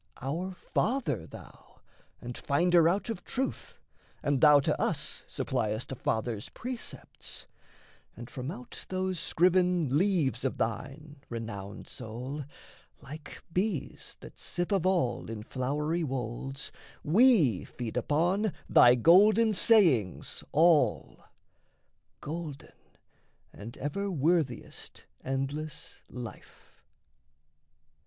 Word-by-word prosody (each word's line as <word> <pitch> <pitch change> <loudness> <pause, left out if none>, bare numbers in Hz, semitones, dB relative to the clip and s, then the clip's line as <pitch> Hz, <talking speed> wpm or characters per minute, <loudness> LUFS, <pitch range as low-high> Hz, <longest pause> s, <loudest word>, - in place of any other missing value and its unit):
Our 175 +8 -3
father 220 - -1
thou, - - -14 0.4
And 120 0 -6
finder 170 +3 +3
out 195 +6 0
of 180 -6 -6
truth, 265 +1 -4 0.5
and 145 -3 +1
thou 150 -2 +8
to - - 0
us - - -1
Suppliest 110 +4 -2
a - - -3
father's 110 -2 -2
precepts; 250 0 -6 0.7
and 120 0 -8
from 130 +1 -6
out 125 -6 -9
Those 185 -1 -1
scriven 180 -4 +2
leaves 165 -8 +2
of 135 - -1
thine, 140 +6 -4
renowned 105 -4 -6
soul 125 +5 -6 0.5
(Like 150 +2 -10
bees 185 -4 -2
that - - -12
sip 175 +3 -3
of 190 -3 +2
all 150 -14 0
in 110 -2 -6
flowery 150 +8 -1
wolds), 135 0 -4 0.3
We 170 - +5
feed 120 -3 -6
upon 175 - +1
thy 120 0 +7
golden 210 - +6
sayings 170 - +3
all 160 0 +3 1.0
Golden, 155 -2 -6 0.8
and 115 +4 -9
ever 200 +8 -2
worthiest 155 -5 -1 0.2
endless 135 +3 -4
life. 125 -2 -10
150 Hz, 105 wpm, -30 LUFS, 125-180 Hz, 1.0 s, thou